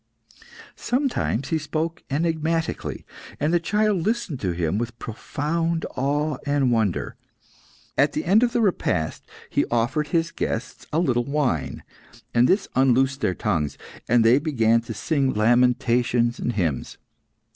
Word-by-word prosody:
Sometimes 245 - -1
he 160 - +1
spoke 160 +3 -3
enigmatically, 160 +2 -1 0.3
and 150 +3 +1
the 175 - +4
child 210 +2 +1
listened 210 - -1
to 95 - -1
him 85 +3 -1
with 120 0 -4
profound 165 +9 -2
awe 145 +2 0
and 145 -3 +1
wonder. 100 - 0 0.8
At - - +4
the - - -2
end 195 +6 +5
of 245 -1 +2
the 240 - +1
repast 90 - 0 0.2
he - - +2
offered 120 +6 0
his 165 +1 0
guests 125 -5 -4
a 155 - 0
little 125 -8 +1
wine, 140 - -1 0.5
and 120 +1 +4
this 195 +2 +2
unloosed 135 +1 +2
their 90 - +1
tongues, 80 -8 -1 0.3
and 120 -1 +4
they 120 +4 +6
began 115 -7 +2
to 115 0 -7
sing 135 +3 0
lamentations 120 +1 +2
and 120 - -1
hymns. 85 - -2
135 Hz, 140 wpm, -24 LUFS, 115-165 Hz, 0.8 s, they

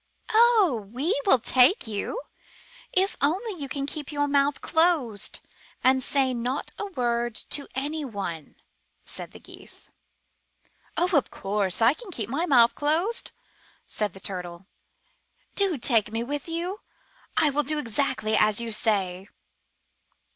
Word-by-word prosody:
*' - - -27
*'0h, 425 - +4
we 280 - 0
will 265 - +7
take 255 - +4
you, 220 - -3 0.7
if 380 +2 +2
only 365 - 0
you 275 - -4
can 275 0 -2
keep 295 0 -6
your 290 -1 0
mouth 280 0 +2
closed, 310 - +1 0.4
and 260 0 +4
say 265 0 +1
not 250 +4 -2
a 410 - -3
word 240 - -1
to 285 +5 -1
anyone," 255 - -4 0.5
said - - -8
the - - -13
Geese. - - -12 1.1
*'0f 340 -5 +2
course 200 +1 -1
I 235 +4 +6
can 435 +6 -11
keep 230 - -4
my 315 +8 -1
mouth 240 -6 +6
closed," 330 +10 0 0.6
said 210 -4 -3
the 190 - -10
Turtle. 180 -2 -5 0.9
*'iDo 385 -8 +2
take 225 -4 +2
me 225 +1 -2
with 290 +5 -4
you. 350 +5 -3 0.6
I 305 -2 +4
will 290 +2 +2
do 305 +2 -1
exactly 250 -4 0
as 215 0 +3
you 235 -1 -3
say." 195 -4 0
265 Hz, 140 wpm, -26 LUFS, 220-315 Hz, 1.1 s, will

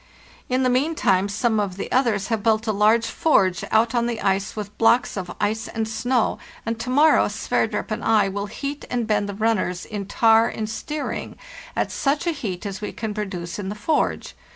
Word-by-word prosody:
In 255 +1 +1
the 255 - +3
meantime 250 - +2
some 220 +2 +1
of 195 -3 -2
the - - -5
others 235 -6 +1
have 225 -2 0
built 220 0 +2
a 220 - +1
large 215 +3 +3
forge 190 - +2
out 225 +2 +3
on 235 -1 +1
the 235 -2 -3
ice 195 0 0
with 210 -1 -6
blocks 235 +2 +3
of 180 -3 -5
ice 215 +2 -1
and 225 -1 -3
snow, 240 +2 0 0.3
and 230 0 -2
to 250 - -4
morrow 295 +5 +5
Sverdrup - - -1
and 215 - -3
I 215 -3 +4
will 200 +1 -3
heat 280 +7 -5
and 245 -2 -1
bend 205 -2 0
the 200 - -5
runners 200 -5 0
in 205 -3 -5
tar 225 +1 +4
and 215 - -4
stearine 295 +7 -4 0.4
at - - -1
such 290 +3 0
a 340 - +2
heat 215 - -5
as 195 -1 -5
we 210 - -4
can 220 -2 -4
produce 195 -4 -5
in 190 -2 -4
the 205 - -4
forge. 290 +9 -1
220 Hz, 200 wpm, -23 LUFS, 200-240 Hz, 0.4 s, morrow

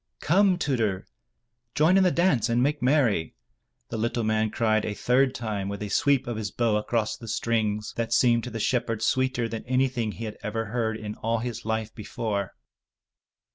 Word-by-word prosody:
"Come, 185 +2 +3
Tudur, 115 - -1 0.7
join 160 +5 +4
in 195 - +5
the 185 - +5
dance 165 - +2
and 120 +1 +2
make 145 +1 0
merry," 125 - +2 0.5
the 115 - -4
little 115 +1 -1
man 110 0 +1
cried 110 -1 +1
a 105 - -3
third 130 +3 +2
time 105 -4 -3
with 100 +1 -5
a 105 - -5
sweep 140 +3 +2
of 120 -2 -4
his 105 -1 -3
bow 115 +1 +1
across 110 +1 -1
the 115 - -11
strings 110 -1 -1
that 115 -1 -2
seemed 120 -1 +3
to - - -4
the 115 - -5
shepherd 115 -2 0
sweeter 130 -2 +1
than 115 -1 -5
anything 125 -3 0
he 115 - -6
had 105 - -6
ever 115 +2 -3
heard 110 0 -2
in 105 -1 -6
all 115 +1 -1
his 120 0 -5
life 110 0 -2
before. 105 -2 -4
115 Hz, 185 wpm, -26 LUFS, 110-125 Hz, 0.7 s, in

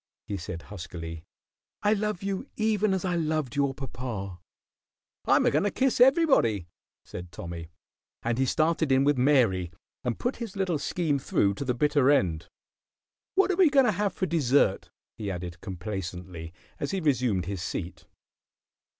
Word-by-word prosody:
he 105 - -4
said, 85 -1 -6
huskily. 85 -5 -7 0.6
"I 210 +1 +4
love 210 -3 -2
you 195 +6 -3
even 215 -1 +1
as 190 0 -1
I 180 -1 0
loved 155 -5 -1
your 140 -2 +1
papa." 120 -9 -5 0.9
"I'm - - +4
a - - +4
goin' 150 - +2
to 205 - +2
kiss 260 +2 +1
everybody," 260 - +4 0.4
said 90 0 -8
Tommy; 85 -2 -7 0.5
and 120 +1 0
he 135 - +2
started 160 0 +1
in 135 0 +5
with 145 +1 +3
Mary 115 -11 +3 0.3
and 120 -3 -1
put 245 - -2
his 230 -5 -6
little 185 -5 0
scheme 155 -4 0
through 100 -5 +1
to 140 - -5
the 125 -1 0
bitter 145 0 +3
end. 90 - +2 0.9
"What 390 0 +4
are - - +1
we 360 -3 +6
going 275 -2 +5
to 230 - +4
have 200 0 -1
for 185 - -1
dessert?" 145 - +2 0.3
he 105 -2 -3
added, 90 -2 -6
complacently, 90 -3 -6 0.3
as 145 - -2
he 195 - -1
resumed 125 - +1
his 95 -1 -4
seat. 85 -1 -5
135 Hz, 165 wpm, -27 LUFS, -, 0.9 s, we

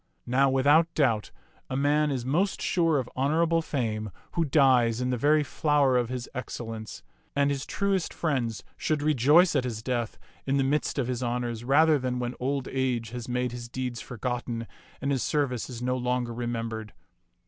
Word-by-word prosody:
Now 135 +3 +3
without 145 +5 +4
doubt 115 -8 +2 0.4
a 130 - -2
man 150 +2 +2
is 130 -4 -2
most 175 +9 +1
sure 165 -4 +2
of 130 -3 -2
honorable 165 +5 +2
fame 110 -8 -2 0.2
who 170 - +1
dies 130 -6 +4
in 125 0 0
the - - +1
very 150 +5 +3
flower 145 -2 +2
of 120 -2 +1
his 125 -1 -4
excellence, 115 - -6 0.3
and 140 0 +3
his 140 -1 -3
truest 195 -3 0
friends 130 -9 -2
should 150 -2 -1
rejoice 150 +5 +5
at - - +2
his 115 -3 -4
death 120 -3 -2 0.3
in 135 +1 +2
the 135 - +3
midst 145 +3 0
of 135 - +1
his 125 0 -3
honors 120 -1 -2
rather 150 +4 +4
than 125 -1 -2
when 120 0 -2
old 135 +1 -1
age 125 -4 -1
has 120 0 -6
made 125 0 -1
his 120 -1 -7
deeds 125 -2 -4
forgotten 120 -1 -4 0.4
and 140 +1 0
his 135 -3 0
service 135 -6 -1
is 120 -1 -6
no 125 +1 0
longer 125 -1 -1
remembered. 115 -2 -4
130 Hz, 180 wpm, -27 LUFS, 120-145 Hz, 0.4 s, rejoice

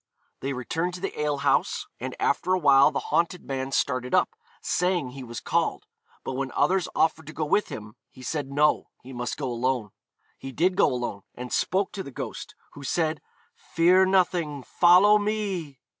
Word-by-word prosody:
They 135 +1 -3
returned 165 +8 -2
to - - -7
the 195 -4 -4
ale 150 -1 0
house, - - +1
and - - -5
after 185 +1 +1
a - - +1
while 140 -4 +6
the 150 - -3 0.2
haunted 170 +1 +1
man 135 0 -3
started 125 -2 0
up, - - +3 0.3
saying 180 -7 0
he 135 0 -8
was 120 -1 -7
called, - - -1 0.4
but - - -4
when 135 0 -3
others 185 -2 +2
offered 160 -1 +1
to 155 - -8
go 155 - -2
with 200 +7 +2
him 105 0 -8 0.2
he 130 - -14
said 145 -1 -3
no, 145 +2 +2
he 130 - -10
must 120 0 -4
go 135 -3 -3
alone. 120 -3 -1 0.5
He 135 - -7
did 180 +7 +1
go - - +4
alone, 120 -5 -3
and 125 0 -7
spoke 190 +1 +1
to 200 - -5
the 160 - -8
ghost, 130 - -7 0.2
who 145 - -10
said, 155 +2 -1 0.3
'Fear 180 +3 +3
nothing; 175 -7 +1
follow 185 - +5
me.' 200 - -3
150 Hz, 185 wpm, -26 LUFS, 130-180 Hz, 0.5 s, while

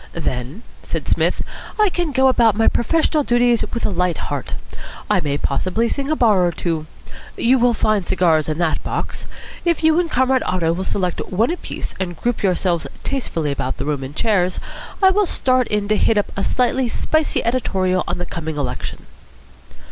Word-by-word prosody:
"Then," 140 - -4 0.2
said - - -4
Psmith, - - +1 0.4
"I 425 -1 +5
can 350 -3 -2
go 265 -1 +4
about 235 -5 +4
my 225 - +3
professional 310 +3 +2
duties 240 -2 +3
with 235 - -1
a - - -1
light 180 -2 0
heart. 145 -2 -4 0.6
I - - +4
may 145 -1 -1
possibly 185 +12 0
sing 275 +4 -2
a 310 - +2
bar 215 -9 +4
or 175 - +2
two. 160 -2 -3 0.5
You 255 +2 +3
will 240 -1 +3
find 215 -2 +1
cigars 165 -5 +2
in 155 - -1
that 165 -2 0
box. - - -4 0.4
If 340 -2 +1
you 320 +1 +5
and 350 -2 0
Comrade 260 -1 +2
Otto 165 -3 0
will 185 +2 -3
select 185 -2 -1
one 220 - +1
apiece 355 - -5
and 175 -3 -3
group 240 -1 -1
yourselves 180 -3 +1 0.2
tastefully 165 - -2
about 130 -2 -3
the 135 - -3
room 145 -2 -2
in 135 +3 -7
chairs, 185 -4 +1 0.4
I 380 - +7
will 405 0 +2
start 255 -5 +2
in 210 -1 -1
to 215 - +3
hit 220 - +3
up 205 - 0
a 195 - -2
slightly 250 0 +1
spicy 315 +6 0
editorial 190 -7 +1
on - - -2
the 175 - -3
coming 160 -3 -5
election." 125 -3 -4
205 Hz, 185 wpm, -20 LUFS, 170-255 Hz, 0.6 s, I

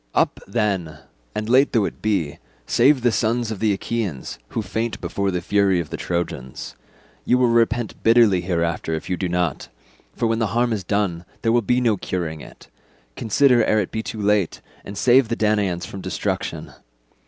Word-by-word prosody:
Up, - - +2
then, 95 -7 -1 0.4
and 105 0 -2
late 130 +4 +4
though 110 -5 +3
it - - -6
be, 100 -9 -1 0.3
save 135 -3 +3
the 120 - +4
sons 115 +1 0
of 105 - -5
the 110 -2 +2
Achaeans 100 - -3
who 110 - -3
faint 110 +4 -3
before 100 0 -2
the 90 -2 -2
fury 100 -1 +2
of 80 -4 -5
the - - -3
Trojans. 75 -7 -4 0.5
You 125 - +3
will 125 -1 +3
repent 115 0 +1
bitterly 115 -5 +5
hereafter 85 -2 -1
if 80 - -6
you - - +2
do 90 0 -2
not, 85 -5 -1 0.5
for - - -1
when 115 0 +1
the 115 - +1
harm 120 -1 +2
is 100 -3 -3
done 95 -3 -1 0.2
there 115 - +3
will 120 +1 +3
be 125 +4 +1
no 115 -4 +2
curing 85 -4 -4
it; - - -14 0.5
consider 120 +2 +3
ere 110 - +2
it 100 - -2
be 110 - -2
too 110 - -6
late, 105 -3 +1 0.2
and 100 - -8
save 125 +2 +5
the 115 - -1
Danaans 105 -5 +1
from 100 - -8
destruction. - - -3
105 Hz, 190 wpm, -22 LUFS, 90-115 Hz, 0.5 s, bitterly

